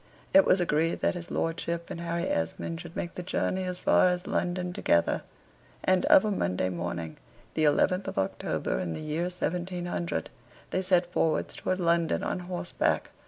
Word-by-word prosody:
It 290 0 +8
was 185 - +4
agreed 165 -1 +1
that - - +2
his 175 -1 -7
lordship 170 +1 -2
and 170 - -5
Harry 170 0 -2
Esmond 120 - -2
should 170 -1 -10
make 175 - -3
the - - -5
journey 185 +1 -1
as 180 -1 -3
far 185 - +4
as 180 0 0
London 180 0 -1
together; 85 - +2 0.6
and 185 +4 +3
of 295 -4 +7
a 210 - +1
Monday 90 - 0
morning, 85 -2 -4 0.4
the 155 - +2
11th 180 +6 +3
of - - -5
October, 95 0 -1
in 85 -2 -2
the - - -5
year 155 +3 -2
1700, 180 -1 -3 0.4
they 185 - +1
set 180 -1 +2
forwards 160 -3 +1
towards 185 - -1
London 170 -1 +2
on - - -1
horseback. 175 -1 -1
175 Hz, 170 wpm, -28 LUFS, 160-180 Hz, 0.6 s, It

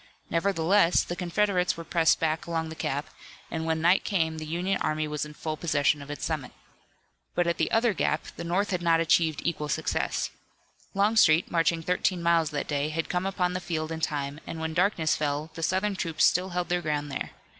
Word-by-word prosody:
Nevertheless, 170 +1 +3
the 175 - -5
Confederates 180 0 +1
were 165 - -6
pressed 165 -1 +3
back 160 0 -1
along 165 -1 -2
the 160 - -7
gap, 150 +1 -3 0.4
and 160 0 -3
when 160 0 0
night 175 +3 +4
came 160 -5 0
the 155 - -6
Union 180 +4 -1
army 155 0 0
was 150 0 -2
in 150 0 -11
full 155 0 -3
possession 150 -2 +1
of 140 - -10
its 145 -3 -4
summit. 155 -5 -3 0.8
But 175 - +2
at 170 0 -1
the - - +1
other 230 -1 +3
gap 155 -4 0
the - - -6
North 185 +5 0
had 180 -2 -1
not 165 -1 +3
achieved 165 -2 +2
equal 150 -3 -1
success. - - -1 0.6
Longstreet, 195 -5 +4
marching 165 -1 +1
thirteen 180 0 0
miles 170 -2 +3
that 145 -2 -3
day, 145 0 -1
had 165 +1 -3
come 180 +1 0
upon 180 -2 0
the 185 - -3
field 160 -2 -3
in 160 - -3
time, 145 -2 -2
and 165 - -5
when 160 0 -3
darkness 175 -3 +2
fell 150 +1 -2
the 165 - -7
Southern 190 +4 0
troops 165 -4 +1
still 185 +2 +2
held 180 0 -2
their 175 0 +1
ground 150 -2 -2
there. 135 - -3
165 Hz, 205 wpm, -27 LUFS, 155-180 Hz, 0.8 s, night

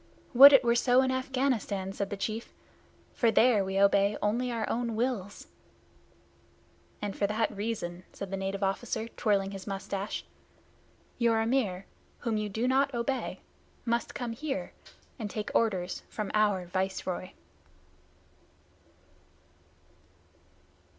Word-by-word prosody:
"Would 275 +3 +11
it 270 -2 +7
were 235 -1 +3
so 245 +2 +4
in 260 - +1
Afghanistan!" 255 -7 -1
said 200 0 -3
the 205 - -4
chief, 220 +3 -4 0.6
"for 235 - +2
there 225 -2 +4
we 190 0 -3
obey 200 +1 +4
only 235 +4 0
our 230 -2 -2
own 235 -1 -1
wills." 220 -4 -2 1.6
"And 205 -2 -3
for 200 - +1
that 215 +1 -1
reason," 200 -4 -4
said 200 -1 -7
the - - -1
native 195 +1 -3
officer, 220 +3 -1
twirling 200 -4 0
his 195 0 -8
mustache, 195 +1 -4 0.9
"your 230 -2 +3
Amir 225 -6 0 0.4
whom 230 -2 -1
you 210 0 -2
do 225 +5 -1
not 270 +1 +2
obey 240 +3 -2 0.4
must 235 0 -1
come 245 -2 -3
here 270 +4 -4 0.5
and 215 -3 -4
take 210 0 -4
orders 185 -6 0
from 215 -2 -4
our 205 -4 +2
Viceroy." 185 0 -3
215 Hz, 125 wpm, -29 LUFS, 195-240 Hz, 1.6 s, Would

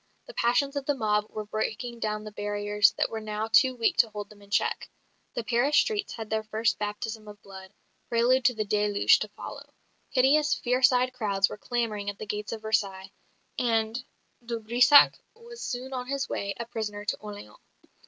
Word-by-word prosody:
The - - -11
passions 275 - +1
of 280 -1 -3
the 290 - +2
mob 210 -3 0
were 215 -1 -6
breaking 220 +3 -3
down 215 -1 -2
the 215 - -8
barriers 205 0 +2
that - - -1
were 225 - -3
now 215 0 -3
too 255 +1 +5
weak 230 -2 +1
to 230 - +4
hold 210 -1 -7
them 205 -1 -16
in 200 - -17
check; 200 - 0 0.5
the 240 - -2
Paris 250 +6 +2
streets 430 -4 +1
had 225 -2 -6
their 220 0 -1
first 220 +1 -1
baptism 215 +1 -4
of 205 0 -11
blood, 190 -1 -11 0.4
prelude 245 +2 +3
to 250 - +4
the 215 -1 -2
deluge 205 0 +3
to - - -3
follow; - - -9 0.4
hideous, 290 +3 +3
fierce 250 +1 +3
eyed 255 0 +1
crowds 200 -5 +1
were - - -7
clamouring 220 -4 -2
at 200 - -6
the 215 - -6
gates 210 0 -4
of 220 -1 -6
Versailles; 200 -3 -1 0.5
and 225 0 0 0.4
de 235 0 -3
Brissac 245 +6 +6 0.2
was 465 +1 -12
soon 255 +1 -5
on 250 -1 -4
his 275 0 -2
way, 200 0 -3
a 235 - -3
prisoner, 210 -3 -5
to - - -1
Orleans. 210 - -10
220 Hz, 195 wpm, -27 LUFS, 210-250 Hz, 0.5 s, Brissac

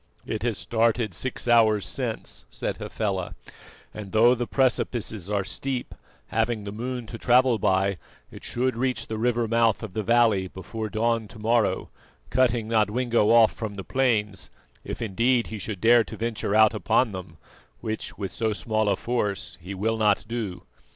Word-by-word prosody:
"It 110 -2 -3
has 115 -3 -1
started 115 -2 +1
six 130 +6 -4
hours 110 -3 +4
since," - - -4
said - - -4
Hafela, 95 -5 -3 0.6
"and 105 -3 -8
though 115 +3 +6
the 120 -1 -2
precipices 115 -6 0
are 100 -1 0
steep, 130 +5 -4 0.4
having 115 -3 0
the 100 - -6
moon 120 +3 -4
to 115 +1 -8
travel 125 -1 +4
by, 95 0 +1 0.3
it - - -12
should 125 0 0
reach 120 -2 -1
the 110 -1 -5
river 120 0 +1
mouth 115 -1 +2
of 105 -4 -7
the 110 - -1
valley 110 -3 +3
before 110 +4 -6
dawn 115 0 0
to 110 - -13
morrow, 110 -3 +1 0.4
cutting 120 -3 +2
Nodwengo 115 +1 +2
off 115 -1 +6
from 110 -3 -5
the 95 - -6
plains, 105 - 0 0.3
if - - -5
indeed 115 +4 +2
he 110 - -4
should 100 0 -4
dare 115 +2 +5
to - - -9
venture 110 -3 -2
out 110 0 +6
upon 110 +2 +2
them, 90 -4 -8 0.4
which, 110 0 -5
with 100 -3 -4
so 110 -2 0
small 110 0 0
a 100 - +3
force, 105 -3 -3
he 95 +4 -7
will 110 +4 0
not 105 -1 +2
do. 110 -6 -4
110 Hz, 170 wpm, -25 LUFS, 105-120 Hz, 0.6 s, though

